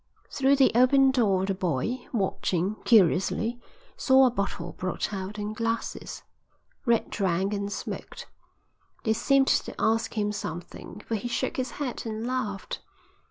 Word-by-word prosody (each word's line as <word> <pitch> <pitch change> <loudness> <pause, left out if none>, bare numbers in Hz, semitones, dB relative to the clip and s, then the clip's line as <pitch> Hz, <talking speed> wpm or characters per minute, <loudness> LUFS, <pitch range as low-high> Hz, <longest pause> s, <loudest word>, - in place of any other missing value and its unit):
Through 275 0 +3
the 270 -1 +5
open 265 +3 +5
door 200 -7 +2
the 195 - 0
boy, 185 - -2
watching 190 -3 0
curiously, 220 +3 +3 0.3
saw 265 0 +5
a 250 - +3
bottle 200 -4 -3
brought 185 +3 -3
out 195 +1 -5
and 210 +1 -4
glasses. 230 +1 -3 0.6
Red 235 -1 +2
drank 190 0 0
and 200 0 -3
smoked. - - -6 0.8
They 220 - +2
seemed 270 +4 +3
to - - +1
ask 225 0 +1
him 210 -1 +1
something, 180 +1 -7
for - - -4
he 220 +2 -2
shook 235 - -2
his 260 -1 -2
head 255 -5 -4
and 220 +1 -4
laughed. 230 -6 -3
220 Hz, 145 wpm, -27 LUFS, 195-245 Hz, 0.8 s, the